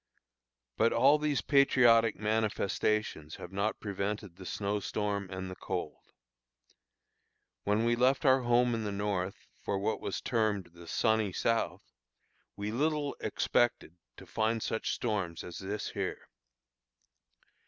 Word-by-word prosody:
But 115 - +3
all 140 +6 +5
these 150 -5 0
patriotic 120 -5 +5
manifestations 105 -5 -1
have 90 - -9
not 100 +3 -1
prevented 100 -2 -3
the 95 0 -10
snow 105 0 -1
storm 100 -2 -2
and 95 0 -5
the 95 - -7
cold. - - -4 1.6
When 105 +3 +2
we 120 0 +3
left 130 +5 +2
our 130 0 +5
home 120 0 +3
in 115 -1 -1
the 105 - -2
North 100 -2 -2 0.2
for 100 - -1
what 105 +3 -1
was - - -3
termed 105 -7 0
"the 85 -1 -13
sunny 110 +1 +1
South," 115 +5 0 0.7
we 105 +1 -3
little 145 +3 0
expected 120 -8 0 0.2
to - - -11
find 110 0 0
such 110 - -1
storms 95 -8 -2
as 90 - -7
this 100 +2 -4
here. - - -4
110 Hz, 130 wpm, -31 LUFS, 100-120 Hz, 1.6 s, all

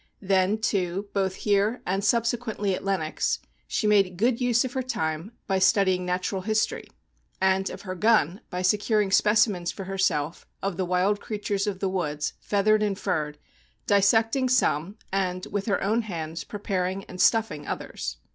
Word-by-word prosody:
Then, 190 +2 +2
too, 195 -2 -1
both 190 -2 0
here, 205 +4 +1
and 195 +2 -1
subsequently 230 -2 0
at - - -4
Lenox, 190 -6 0 0.3
she - - -1
made 195 -4 +3
good 235 +4 +1
use 245 0 +3
of 255 - -5
her 260 - -1
time 160 -6 -3
by 190 -1 +1
studying 190 -2 +3
natural 185 +2 -1
history, 215 +2 -1 0.5
and 190 0 +2
of 185 - -8
her 185 -2 -4
gun, 205 - +2
by 180 +1 -3
secur 210 +3 +2
ing 195 - -4
specimens 210 -4 +3
for 195 - -7
herself 185 -5 -1
of 195 -2 -2
the 185 - -1
wild 185 +3 +1
crea 215 - -4
tures 205 -1 -1
of 195 -2 -3
the 195 - +1
woods, 150 -6 -2
feathered 210 +1 +2
and 205 -2 0
furred, 155 -7 -2 0.5
dissecting 225 +6 +3
some, 200 - +1 0.2
and, 185 -1 -1
with 200 0 -2
her 200 - +1
own 220 +4 +2
hands, 165 -6 -5
preparing 195 -2 -2
and 185 -1 -6
stuffing 215 -11 +2
others. 60 0 -5
195 Hz, 165 wpm, -26 LUFS, 185-215 Hz, 0.5 s, made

